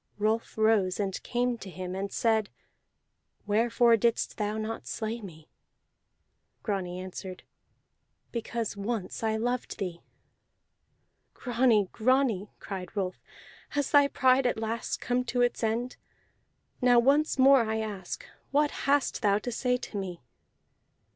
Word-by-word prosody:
Rolf 215 +2 -1
rose, 215 -4 +3
and 195 -2 -2
came 245 -1 -1
to 195 - -8
him, 185 0 -6
and 195 +1 -3
said: 220 -3 +1 1.0
"Wherefore 230 +2 +4
didst 235 +1 0
thou 210 0 -1
not 220 +1 -4
slay 225 +1 -3
me?" 160 -6 -11 1.2
Grani 185 -4 -2
answered: 185 0 -7 0.9
"Because 230 -2 -3
once 200 -1 -3
I 220 -1 +1
loved 245 +2 -2
thee." 175 -3 -4 1.3
"Grani, 235 -5 +2
Grani," 235 -4 +2
cried 190 -1 -7
Rolf, 185 -2 -2 0.6
"has 285 -2 0
thy 285 -1 +6
pride 260 -1 +3
at 245 - 0
last 225 +1 -3
come 245 0 0
to 245 0 0
its 245 -1 0
end? 230 +3 -1 0.8
Now 245 -1 +5
once 285 +6 +3
more 270 0 +7
I 220 -1 -1
ask: 205 -4 -5 0.2
What 295 +1 +2 0.2
hast 285 -2 +2
thou 200 -3 +3
to 245 +4 -4
say 250 +2 +1
to 230 - -7
me? 180 -3 -5
225 Hz, 130 wpm, -29 LUFS, 200-245 Hz, 1.3 s, more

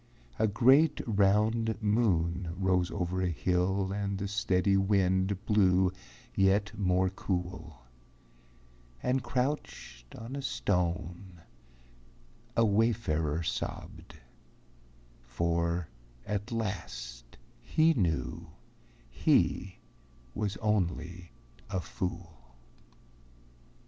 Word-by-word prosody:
A 110 - +4
great, 135 +9 +4
round 110 +2 +2
moon 90 -6 +1
rose 90 -2 +1
over 90 -1 -2
a 90 - +1
hill 95 +3 0
And 100 -1 -2
the 100 +1 -3
steady 95 -2 +1
wind 95 0 +1
blew 95 -3 +4 0.4
yet 100 - +2
more 95 -2 +1
cool; 90 -8 -4 1.2
And 130 +1 +1
crouched 125 - -3
on 115 +4 -7
a 140 - -3
stone 90 - -2 1.2
a 115 - +5
wayfarer 100 -8 +1
sobbed, 80 - -5 1.1
For 85 +5 -1 0.4
at 105 +3 -3
last 70 - -5 0.2
he 160 - +3
knew 90 - -1 0.6
he 95 0 +1 0.5
was 100 -2 -2
only 90 -4 -1 0.4
a 95 - -1
fool. 85 -10 -6
95 Hz, 85 wpm, -30 LUFS, 85-105 Hz, 1.2 s, a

